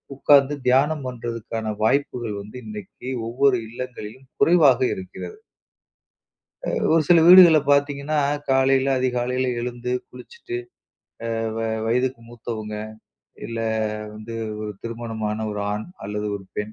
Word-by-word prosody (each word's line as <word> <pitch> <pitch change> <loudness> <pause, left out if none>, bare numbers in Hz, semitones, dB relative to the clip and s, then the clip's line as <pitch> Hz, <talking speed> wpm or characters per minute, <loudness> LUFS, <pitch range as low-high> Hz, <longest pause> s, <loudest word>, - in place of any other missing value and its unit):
உக்கார்ந்து 140 +1 +4
தியானம் 140 +3 +3
பண்றதுக்கான 115 -2 -4
வாய்ப்புகள் 120 -3 0
வந்து 105 +5 -10
இன்னைக்கு 105 +3 -9 0.2
ஒவ்வொரு 130 +1 +3
இல்லங்களிலும் 125 +1 -8
குறைவாக 150 -8 +5 0.2
இருக்கிறது. 95 - -8 1.3
அ - - -3 0.2
ஒரு 165 0 +5
சில 170 -2 +7
வீடுகள்ல 175 -3 +9
பாத்தீங்கன்னா, 145 +1 +1 0.3
காலையில 135 0 +3
அதிகாலையில 125 0 0
எழுந்து 125 0 -4 0.2
குளிச்சுட்டு, 425 -6 -9 0.8
அ - - -2 0.2
வ - - -3 0.3
வயதுக்கு 125 +1 0
மூத்தவுங்க, 110 -2 -6 0.7
இல்ல 115 0 -5 0.6
வந்து 110 +2 -8 0.3
ஒரு 105 -1 -4
திருமணமான 115 -2 -4
ஒரு 105 0 -4
ஆண் 105 +1 -3 0.2
அல்லது 105 +1 -3
ஒரு 95 - -12
பெண் 105 +1 -3
125 Hz, 115 wpm, -23 LUFS, 110-140 Hz, 1.3 s, வீடுகள்ல